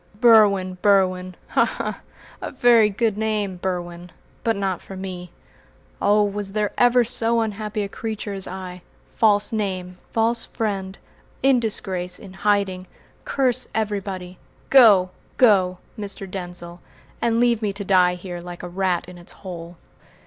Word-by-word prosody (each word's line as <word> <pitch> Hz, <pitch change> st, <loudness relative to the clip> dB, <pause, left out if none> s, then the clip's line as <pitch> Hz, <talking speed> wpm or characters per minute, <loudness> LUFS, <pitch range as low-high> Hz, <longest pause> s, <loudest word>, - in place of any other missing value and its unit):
"Berwin! 200 Hz, -6 st, +5 dB
Berwin! 185 Hz, -2 st, +2 dB
Ha! -, -, +3 dB
ha! -, -, -3 dB, 0.4 s
A -, -, -4 dB
very 240 Hz, -4 st, +5 dB
good 215 Hz, 0 st, -1 dB
name, 210 Hz, -4 st, -1 dB
Berwin, 175 Hz, -1 st, -4 dB, 0.3 s
but 225 Hz, -1 st, +1 dB
not 195 Hz, -3 st, -2 dB
for 195 Hz, -, -9 dB
me. 180 Hz, -2 st, -7 dB, 0.7 s
Oh, 210 Hz, +1 st, +4 dB
was 205 Hz, -1 st, -3 dB
there 210 Hz, -1 st, 0 dB
ever 245 Hz, 0 st, +4 dB
so 235 Hz, -1 st, 0 dB
unhappy 215 Hz, -1 st, -3 dB
a -, -, -3 dB
creature 215 Hz, 0 st, -5 dB
as 195 Hz, -1 st, -5 dB
I? 180 Hz, -1 st, -7 dB, 0.3 s
False 210 Hz, -1 st, +2 dB
name, 185 Hz, -4 st, -3 dB
false 230 Hz, +1 st, +1 dB
friend, 195 Hz, -3 st, -3 dB, 0.5 s
in 270 Hz, -2 st, +5 dB
disgrace, 185 Hz, -5 st, -2 dB
in 190 Hz, -, -12 dB
hiding! 195 Hz, -2 st, 0 dB, 0.4 s
Curse 255 Hz, -2 st, +1 dB
everybody! 195 Hz, -4 st, -3 dB, 0.3 s
Go! 205 Hz, -9 st, +7 dB, 0.3 s
go! 190 Hz, -7 st, +4 dB, 0.2 s
Mr. 200 Hz, -1 st, -6 dB
Denzil, 175 Hz, -2 st, -7 dB, 0.4 s
and 230 Hz, -1 st, +2 dB
leave 235 Hz, -2 st, +3 dB
me 210 Hz, -2 st, 0 dB
to 200 Hz, +1 st, -5 dB
die 180 Hz, -2 st, +4 dB
here 180 Hz, -1 st, -7 dB
like 175 Hz, 0 st, -9 dB
a -, -, -4 dB
rat 180 Hz, -1 st, -1 dB
in 180 Hz, -1 st, -11 dB
its 175 Hz, -, -10 dB
hole!" 170 Hz, -1 st, -8 dB
195 Hz, 145 wpm, -22 LUFS, 185-220 Hz, 0.7 s, Go